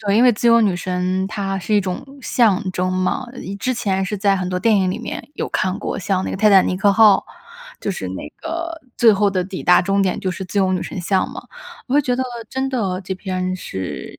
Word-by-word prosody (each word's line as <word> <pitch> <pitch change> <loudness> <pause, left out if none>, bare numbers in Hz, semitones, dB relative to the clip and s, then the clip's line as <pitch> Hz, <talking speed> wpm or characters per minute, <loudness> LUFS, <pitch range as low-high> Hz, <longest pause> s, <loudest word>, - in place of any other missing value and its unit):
对， 205 -1 +1
因 240 - +5
为 245 - +6
自 235 +2 +1
由 230 0 +6
女 200 -5 +2
神 185 +1 -1
它 195 -2 -3
是 195 +3 -4
一 205 - +5
种 185 +3 -4 0.2
象 220 -7 +2
征 185 +1 -1
嘛， 185 +7 -1
一 195 - -6
之 255 +6 -1
前 195 -5 -1
是 205 +1 -3
在 200 -1 +3
很 180 -1 -2
多 180 0 -1
电 220 +2 +3
影 185 -2 +2
里 - - -3
面 - - -7
有 - - -3
看 185 0 -1
过， - - -3
像 190 0 0
那 - - -3
个 - - -3
《泰 215 - +5
坦 195 -2 +6
尼 185 - -1
克 200 +1 +3
号》， 210 -2 +5 0.6
就 200 - 0
是 95 - -5
那 95 - -6
个 330 0 -4 0.2
最 230 -2 +6
后 200 0 +2
的 185 -2 -1
抵 190 0 -6
达 180 - +6
终 195 +2 +1
点 185 - 0
就 185 - -2
是 190 - -6
自 195 +3 -3
由 190 -1 +2
女 185 - -1
神 185 - -5
像 190 +2 0
嘛。 - - -7 0.5
我 260 - -2
会 290 - +5
觉 250 -1 0
得 260 - 0 0.3
真 265 +1 -1
的 195 -8 -1
这 190 +1 -4
篇 185 -1 -3
是 95 - -6
195 Hz, 270 characters per minute, -20 LUFS, 185-220 Hz, 0.6 s, 为